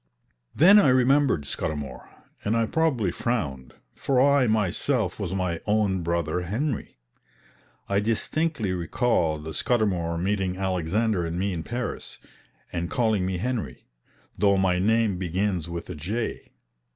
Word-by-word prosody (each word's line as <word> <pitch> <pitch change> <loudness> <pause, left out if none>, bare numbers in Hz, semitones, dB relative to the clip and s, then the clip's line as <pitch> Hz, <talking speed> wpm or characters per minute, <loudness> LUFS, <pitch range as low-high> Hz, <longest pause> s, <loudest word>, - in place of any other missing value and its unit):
Then 195 +7 +8
I 200 - +4
remembered 130 - +3
Scudamour, 70 -4 -5 0.3
and 110 +3 +1
I 115 - +2
probably 130 - +1
frowned, 70 - -3 0.2
for 135 -2 0
I 140 -1 +4
myself 110 0 0
was 95 -2 -3
my 90 -3 -2
own 105 -3 +1
brother 85 0 -1
Henry. 115 - -3 0.9
I 100 0 +1
distinctly 115 - 0
recalled 85 -4 0
Scudamour 90 -9 0
meeting 95 0 -1
Alexander 95 +2 0
and 85 +1 -3
me 95 +1 -1
in 85 - -3
Paris, 120 +7 -5 0.6
and 85 0 -2
calling 110 -6 +1
me 95 -1 -2
Henry, 105 - -4 0.5
though 100 0 +3
my 95 -2 +2
name 110 -1 +2
begins 90 -1 -1
with 85 0 -5
a 90 - -5
J. 100 +10 -4
100 Hz, 130 wpm, -25 LUFS, 85-115 Hz, 0.9 s, Then